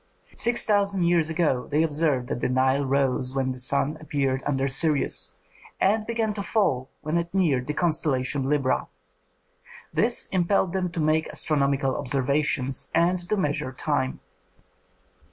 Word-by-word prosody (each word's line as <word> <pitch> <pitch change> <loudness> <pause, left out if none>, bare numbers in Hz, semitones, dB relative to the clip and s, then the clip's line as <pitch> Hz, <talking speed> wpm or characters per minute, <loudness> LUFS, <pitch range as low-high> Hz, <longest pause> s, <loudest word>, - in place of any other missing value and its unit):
Six 240 0 +3
thousand 200 -3 +1
years 170 -2 +2
ago 160 -6 0
they 150 +2 +1
observed 150 -5 0
that 145 - -2
the - - -1
Nile 130 +2 +2
rose 135 -1 0
when 130 -1 0
the 130 - -7
sun 140 +4 +1
appeared 135 -3 -1
under 135 -1 0
Sirius, 145 +2 +1 0.4
and 215 +2 +1
began 225 -2 -1
to 205 - -4
fall 140 - 0
when 155 +3 -1
it 170 0 -5
neared 145 -10 +1
the 150 - -3
constellation 140 -5 -1
Libra. 140 -3 0 1.1
This - - +1
impelled 185 0 +1
them 185 -2 -1
to 170 - -3
make 155 +1 +1
astronomical 140 -3 +1
observations 135 0 -1
and 180 +2 +2
to 215 - +1
measure 150 -5 -1
time. 130 -1 -2
150 Hz, 145 wpm, -25 LUFS, 135-170 Hz, 1.1 s, Six